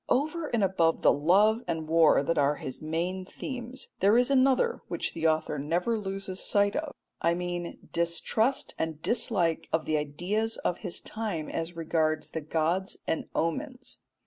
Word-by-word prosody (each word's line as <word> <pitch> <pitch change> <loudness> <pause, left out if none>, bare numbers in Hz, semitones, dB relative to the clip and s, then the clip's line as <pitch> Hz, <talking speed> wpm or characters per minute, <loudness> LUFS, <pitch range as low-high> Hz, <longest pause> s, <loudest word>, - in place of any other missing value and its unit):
Over 310 +4 +1
and 230 -6 0
above 170 -4 +2
the - - +6
love 200 +9 +4
and 160 -2 -2
war 160 -3 +5
that 165 +2 0
are 145 +1 +3
his 130 - -7
main 170 +4 -2
themes, 250 +5 -6
there 205 +4 +5
is 250 +2 +3
another 275 - +3
which - - -3
the 165 0 +1
author 155 -2 0
never 175 +10 0
loses 195 -1 -4
sight 205 0 +2
of 300 -1 -3 0.3
I 170 0 +2
mean 175 -1 -4 0.2
distrust 170 +9 0
and 160 -2 -2
dislike 185 -8 +1
of 160 -1 +1
the 155 - +1
ideas 180 +10 -1
of 175 - -2
his 185 -5 -4
time 205 -8 -4
as 165 +1 -4
regards 160 -1 0
the 160 - -3
gods 165 +5 0
and 160 - -1
omens. 260 - -2
175 Hz, 165 wpm, -28 LUFS, 160-225 Hz, 0.3 s, the